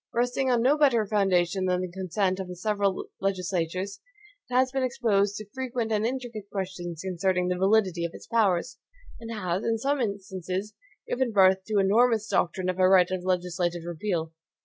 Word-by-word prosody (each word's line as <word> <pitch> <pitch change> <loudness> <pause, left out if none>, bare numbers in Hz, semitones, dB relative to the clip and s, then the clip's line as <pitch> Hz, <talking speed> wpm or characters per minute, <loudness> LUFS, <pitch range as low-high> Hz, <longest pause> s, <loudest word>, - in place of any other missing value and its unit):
Resting 245 +2 +1
on 240 -2 +2
no 285 +4 +3
better 245 -7 +4
foundation 190 -3 +1
than 180 0 +1
the 185 -1 -4
consent 185 +1 -1
of 190 - -4
the 180 - -7
several 200 0 -1
legislatures, 185 0 -2 0.5
it 250 - -3
has 255 0 +3
been 270 0 -1
exposed 225 -6 +1
to 215 - -6
frequent 250 -3 -3
and 215 +1 +1
intricate 240 -5 -5
questions 175 -4 -5
concerning 180 0 0
the 180 - +1
validity 190 -3 +2
of 170 - -2
its - - -11
powers, 210 -2 +1 0.4
and 230 0 -8
has, 185 -3 -2
in 230 0 +1
some 275 +4 0
instances, 195 -1 -4 0.3
given 250 -1 0
birth 190 -2 +4
to 215 - -3
the 200 - +5
enormous 220 +2 +3
doctrine 180 -1 0
of 185 0 -2
a 185 0 +5
right 185 -1 +5
of 185 -1 -2
legislative 180 -1 -1
repeal. 170 -1 -3
195 Hz, 180 wpm, -27 LUFS, 180-225 Hz, 0.5 s, the